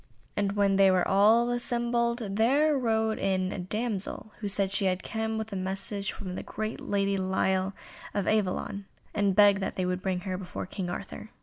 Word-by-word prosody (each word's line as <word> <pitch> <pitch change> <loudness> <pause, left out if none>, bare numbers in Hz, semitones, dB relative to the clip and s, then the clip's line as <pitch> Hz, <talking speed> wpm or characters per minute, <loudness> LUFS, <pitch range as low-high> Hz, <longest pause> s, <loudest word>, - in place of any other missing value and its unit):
And 200 -1 0
when 200 -1 +2
they 195 -1 +6
were 185 -1 +3
all 220 +5 +4
assembled, 240 0 0 0.2
there 285 +7 +4
rode 220 -4 +1
in 190 -1 0
a - - -4
damsel, 210 +2 -3
who 210 - -3
said 195 -1 +1
she 195 0 +1
had 185 0 0
come 220 0 -2
with 220 -1 -4
a - - -2
message 195 +1 -3
from 185 -3 -7
the - - -4
great 215 +2 -5
Lady 200 -1 0
Lile 190 0 0 0.4
of 200 -2 0
Avelion, 200 -1 0 0.3
and 200 -2 +1
begged 205 -1 +6
that 195 - -3
they 185 - -1
would 180 0 -1
bring 185 -1 -1
her 185 -1 -3
before 180 -2 -6
King 185 -1 -5
Arthur. 200 +4 -6
200 Hz, 190 wpm, -28 LUFS, 190-220 Hz, 0.4 s, they